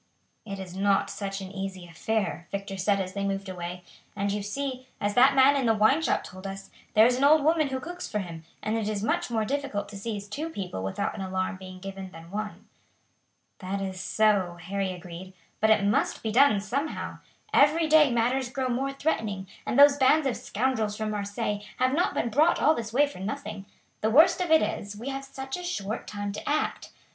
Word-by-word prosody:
"It 195 -1 -5
is 185 -2 -8
not 195 0 +2
such 195 -1 -4
an 190 -1 -7
easy 195 -2 -5
affair," 185 +1 -2
Victor 195 0 -4
said 195 +1 +1
as 185 -1 -3
they 200 - -3
moved 195 0 -2
away; 180 -1 -6 0.3
"and 200 0 -1
you 205 +1 -2
see, 255 +4 -4
as 205 0 0
that 260 +4 +6
man 270 +1 +6
in 265 -4 +1
the 225 - +4
wine 220 +9 +4
shop - - +1
told 185 +1 -9
us, 195 0 -8 0.2
there 215 +1 +8
is 245 +1 +3
an 265 - 0
old 300 +1 +6
woman 315 0 +3
who 265 -1 -3
cooks 350 +6 -6
for 210 - -2
him, 170 -5 -5 0.2
and 215 - 0
it 220 -2 -1
is 210 -1 -2
much 345 +6 0
more 220 -2 0
difficult 265 -6 -2
to 205 - -10
seize 205 -1 -4
two 295 +11 -4
people 185 - -5
without 95 0 -2
an 205 - -6
alarm 185 0 -2
being 185 0 -10
given 195 0 -7
than 165 -1 -13
one." 210 +1 -5 0.9
"That 195 +1 -3
is 190 -1 -4
so," 195 -4 +2
Harry 190 +2 -2
agreed; 180 +1 -9 0.3
"but 220 - +3
it 215 -2 +5
must 205 - +1
be 220 - -1
done 245 -3 +5
somehow. 275 +9 -3 0.3
Every 315 0 +5
day 310 -2 +6
matters 245 +2 +1
grow 260 +1 -2
more 265 +3 -1
threatening, 220 -10 -1 0.2
and - - 0
those 285 0 +8
bands 285 +3 +4
of 260 -4 +1
scoundrels 220 -2 -1
from 215 -1 -2
Marseilles 205 0 -3
have 255 +1 +2
not 345 +5 +1
been 235 - 0
brought 295 +8 +3
all 310 - +5
this 225 -5 -5
way 280 +5 +4
for 285 -9 -9
nothing. 200 0 -5 0.3
The 220 - +2
worst 310 +9 +6
of 355 - -1
it 320 0 +6
is, 205 0 -4
we 240 +6 -5
have 270 0 -4
such 270 0 -6
a 360 - -7
short 220 - -4
time 205 -1 -4
to 205 - -5
act. 300 +1 -1
215 Hz, 215 wpm, -27 LUFS, 195-270 Hz, 0.9 s, there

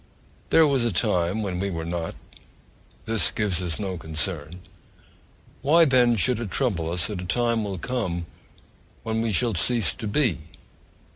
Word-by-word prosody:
There 165 - +6
was 135 -4 +2
a 120 - +1
time 90 +3 +1
when 90 -3 -3
we 100 +1 -1
were 80 -3 -4
not: 85 -1 -4 0.9
this 110 -1 +2
gives 100 -5 0
us 90 0 -2
no 95 -3 -3
concern 80 +1 -3 1.0
why, 165 +4 +5
then, 125 -4 +4
should 115 +3 +1
it 115 -4 -4
trouble 90 -10 -1
us 85 0 0
that 100 -4 -4
a - - -6
time 115 +3 +1
will 100 -2 -4
come 90 -6 -3 0.8
when 110 0 -1
we 115 -1 0
shall 115 +3 +2
cease 115 +6 +1
to 110 - -6
be? 105 - +1
100 Hz, 160 wpm, -25 LUFS, 85-120 Hz, 1.0 s, There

